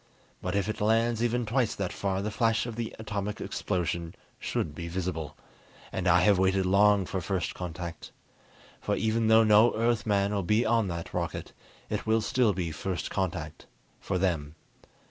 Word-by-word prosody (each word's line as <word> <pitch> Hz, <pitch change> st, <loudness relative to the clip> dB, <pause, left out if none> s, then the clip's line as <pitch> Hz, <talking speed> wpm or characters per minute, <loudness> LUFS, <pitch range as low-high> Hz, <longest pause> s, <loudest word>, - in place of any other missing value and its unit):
But -, -, -2 dB
if 100 Hz, -1 st, +1 dB
it 110 Hz, -, -4 dB
lands 115 Hz, +2 st, +2 dB
even 120 Hz, 0 st, +1 dB
twice 120 Hz, +1 st, +1 dB
that 95 Hz, -2 st, -3 dB
far 95 Hz, -1 st, -2 dB
the 105 Hz, -, -2 dB
flash 115 Hz, +1 st, +1 dB
of 120 Hz, -2 st, -5 dB
the 115 Hz, -1 st, -4 dB
atomic 105 Hz, -2 st, -4 dB
explosion 85 Hz, -1 st, -2 dB, 0.2 s
should 75 Hz, -, -2 dB
be 85 Hz, +2 st, -6 dB
visible. 85 Hz, -4 st, -4 dB, 0.5 s
And 95 Hz, 0 st, -2 dB
I 90 Hz, 0 st, +5 dB
have 100 Hz, 0 st, +4 dB
waited 95 Hz, 0 st, +2 dB
long 100 Hz, +1 st, +4 dB
for 95 Hz, +1 st, -3 dB
first 95 Hz, -1 st, -2 dB
contact. 85 Hz, -1 st, -6 dB, 0.7 s
For -, -, -1 dB
even 110 Hz, 0 st, +1 dB
though 110 Hz, 0 st, +6 dB
no 110 Hz, +2 st, +5 dB
Earthman 105 Hz, -3 st, +1 dB
will 100 Hz, -, 0 dB
be 105 Hz, +6 st, +2 dB
on 115 Hz, -2 st, +2 dB
that 85 Hz, -2 st, -5 dB
rocket, -, -, -3 dB, 0.3 s
it -, -, -3 dB
will 110 Hz, 0 st, +3 dB
still 120 Hz, 0 st, +2 dB
be 90 Hz, -4 st, -3 dB
first 90 Hz, +3 st, -4 dB
contact 85 Hz, -5 st, -3 dB, 0.3 s
for 95 Hz, -, -2 dB
them. 80 Hz, -5 st, -1 dB
100 Hz, 170 wpm, -28 LUFS, 90-110 Hz, 0.7 s, though